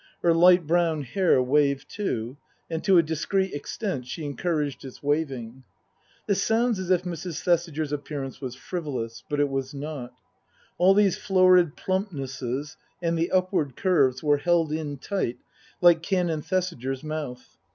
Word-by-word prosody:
Her 170 Hz, -, +5 dB
light 175 Hz, +1 st, +6 dB
brown 165 Hz, -2 st, +1 dB
hair 140 Hz, -1 st, +2 dB
waved, 140 Hz, +1 st, +2 dB
too, 125 Hz, -, -3 dB, 0.4 s
and 160 Hz, 0 st, -3 dB
to 195 Hz, -3 st, +5 dB
a 170 Hz, -, +6 dB
discreet 190 Hz, +5 st, -1 dB
extent 145 Hz, -, -4 dB
she 150 Hz, +5 st, -5 dB
encouraged 145 Hz, -1 st, -2 dB
its 130 Hz, 0 st, -11 dB
waving. 135 Hz, -5 st, -2 dB, 0.6 s
This 200 Hz, -, +1 dB
sounds 230 Hz, -1 st, +1 dB
as 185 Hz, -1 st, -5 dB
if 180 Hz, -1 st, +3 dB
Mrs. 175 Hz, -2 st, -5 dB
Thesiger's 165 Hz, -4 st, 0 dB
appearance 145 Hz, -2 st, -5 dB
was 125 Hz, -2 st, -5 dB
frivolous. 130 Hz, -8 st, -5 dB
But 145 Hz, -1 st, -1 dB
it 145 Hz, -, +3 dB
was 135 Hz, 0 st, -3 dB
not. 140 Hz, -3 st, -6 dB, 0.7 s
All 190 Hz, +2 st, +6 dB
these 200 Hz, -3 st, +3 dB
florid 185 Hz, -4 st, +4 dB
plumpnesses 140 Hz, -, -3 dB, 0.2 s
and 170 Hz, -1 st, 0 dB
the 165 Hz, +1 st, 0 dB
upward 185 Hz, -8 st, 0 dB
curves 140 Hz, -9 st, +2 dB
were 145 Hz, -1 st, +4 dB
held 165 Hz, +1 st, +1 dB
in 150 Hz, -2 st, -3 dB
tight, 135 Hz, -, -2 dB, 0.4 s
like 175 Hz, -2 st, +6 dB
Canon 175 Hz, -3 st, 0 dB
Thesiger's 145 Hz, -8 st, -2 dB
mouth. 150 Hz, -5 st, -6 dB
155 Hz, 150 wpm, -26 LUFS, 140-180 Hz, 0.7 s, light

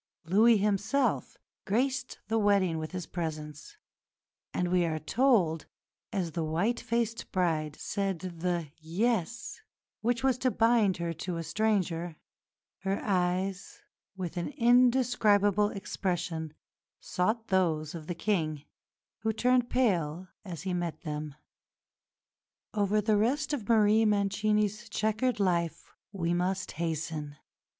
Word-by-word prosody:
Louis 215 Hz, +6 st, +5 dB
himself 210 Hz, +7 st, 0 dB, 0.3 s
graced 255 Hz, +5 st, 0 dB
the 225 Hz, +1 st, +1 dB
wedding 195 Hz, -5 st, +2 dB
with 155 Hz, 0 st, -5 dB
his 180 Hz, -2 st, -4 dB
presence; 155 Hz, -, -6 dB, 0.7 s
and 180 Hz, -1 st, -1 dB
we 180 Hz, -1 st, +3 dB
are 160 Hz, -2 st, 0 dB
told, 170 Hz, -, +2 dB, 0.4 s
as 180 Hz, -5 st, -2 dB
the 165 Hz, +1 st, -2 dB
white 175 Hz, +10 st, 0 dB
faced 230 Hz, -1 st, -2 dB
bride 160 Hz, -5 st, 0 dB
"said 195 Hz, -2 st, -2 dB
the 170 Hz, -2 st, -3 dB
'yes' 220 Hz, -, -1 dB, 0.4 s
which 240 Hz, +2 st, 0 dB
was 260 Hz, -2 st, +2 dB
to 255 Hz, -, +2 dB
bind 225 Hz, -5 st, +3 dB
her 170 Hz, -1 st, -2 dB
to 170 Hz, +2 st, -4 dB
a 165 Hz, -, -3 dB
stranger, 175 Hz, -3 st, 0 dB, 0.6 s
her 195 Hz, +1 st, -1 dB
eyes, 185 Hz, 0 st, -1 dB, 0.3 s
with 180 Hz, -2 st, -5 dB
an 175 Hz, -, -2 dB
indescribable 235 Hz, -5 st, +4 dB
expression, 175 Hz, -6 st, -3 dB, 0.4 s
sought 215 Hz, +5 st, -1 dB
those 160 Hz, -5 st, +1 dB
of 160 Hz, -2 st, -8 dB
the 175 Hz, -, -3 dB
King, 160 Hz, -7 st, -1 dB, 0.6 s
who 220 Hz, 0 st, 0 dB
turned 245 Hz, +2 st, +2 dB
pale 185 Hz, -8 st, 0 dB
as 175 Hz, -6 st, -7 dB
he 185 Hz, -1 st, -2 dB
met 175 Hz, -2 st, -3 dB
them." 150 Hz, -3 st, -5 dB, 1.4 s
Over 210 Hz, 0 st, +2 dB
the 215 Hz, 0 st, +2 dB
rest 280 Hz, +8 st, +1 dB
of 235 Hz, -8 st, -4 dB
Marie 220 Hz, 0 st, +5 dB
Mancini's 210 Hz, +1 st, +1 dB
chequered 220 Hz, +4 st, 0 dB
life 170 Hz, -4 st, 0 dB, 0.2 s
we 170 Hz, -4 st, -1 dB
must 185 Hz, +2 st, -1 dB
hasten. 155 Hz, -2 st, -3 dB
195 Hz, 125 wpm, -30 LUFS, 170-220 Hz, 1.4 s, Louis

